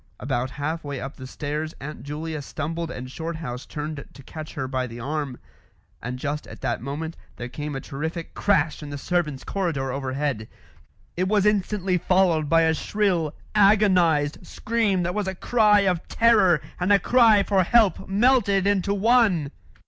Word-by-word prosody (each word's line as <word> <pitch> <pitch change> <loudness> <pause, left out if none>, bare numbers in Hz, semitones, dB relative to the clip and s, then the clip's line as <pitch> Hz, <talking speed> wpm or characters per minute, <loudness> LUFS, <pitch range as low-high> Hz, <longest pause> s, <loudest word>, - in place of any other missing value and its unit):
About 130 -1 -2
half 155 +4 -4
way 140 -2 -5
up 135 +1 -7
the 130 - -8
stairs 150 +3 -4
Aunt 150 +2 -7
Julia 155 +1 -5
stumbled 160 +4 -4
and 125 -4 -6
Shorthouse 160 -6 -5
turned 150 -1 -5
to 140 - -13
catch 155 +3 -9
her 130 -2 -3
by 130 -1 -2
the 115 0 -9
arm, 140 0 -3 0.6
and 125 +1 -4
just 145 +3 -4
at - - -11
that - - -2
moment 150 +5 -5 0.2
there 120 - -6
came 145 +3 -5
a - - -2
terrific 160 +5 -5
crash 165 -7 +1
in 150 - -7
the 145 - -5
servants' 150 -3 -1
corridor 160 -9 -2
overhead. 135 -3 -2 0.7
It 185 +1 0
was 205 0 +2
instantly 195 -3 +1
followed 170 -5 +2
by 165 0 +5
a 160 0 +3
shrill, 175 -4 0 0.2
agonised 185 -8 +4
scream 215 -5 0
that 175 +1 -1
was 210 -1 -2
a 190 - -3
cry 210 0 +4
of 185 -4 0
terror 210 -8 +4 0.2
and 180 +3 +1
a 200 - +7
cry 220 0 +5
for 195 -2 +2
help 215 0 +3
melted 205 -2 +3
into 200 0 +1
one. 205 - +3
165 Hz, 170 wpm, -24 LUFS, 145-195 Hz, 0.7 s, a